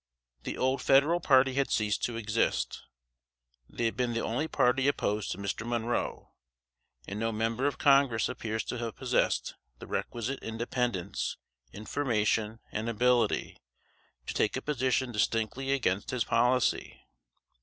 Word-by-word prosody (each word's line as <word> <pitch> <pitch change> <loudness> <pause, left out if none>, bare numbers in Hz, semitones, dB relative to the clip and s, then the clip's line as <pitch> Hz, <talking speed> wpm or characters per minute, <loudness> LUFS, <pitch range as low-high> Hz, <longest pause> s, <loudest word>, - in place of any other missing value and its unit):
The - - -5
old 130 +1 +1
Federal 145 +6 +4
party 135 -4 +4
had 140 +1 +1
ceased 105 -1 0
to 120 -1 -3
exist. 110 0 0 0.9
They 120 - -3
had 115 - 0
been 125 -2 0
the 115 - -1
only 135 +8 -1
party 130 -1 +2
opposed 105 -7 0
to - - -3
Mr. 100 +2 -3
Monroe; 120 0 -2 0.8
and 100 +2 -5
no 115 +1 0
member 115 +4 0
of 145 - -2
Congress 135 -5 +4
appears 110 -3 -3
to 125 - -4
have 115 -2 -4
possessed - - 0 0.2
the - - -10
requisite 120 +3 -3
independence, 115 -3 -2 0.3
information 110 - -1
and 110 +2 -2
ability, 120 -1 +1 0.7
to - - -4
take 110 - +1
a - - -3
position 130 -3 0
distinctly 115 +5 0
against 105 -8 0
his 125 -2 0
policy. 125 +2 +1
120 Hz, 140 wpm, -30 LUFS, 110-130 Hz, 0.9 s, Federal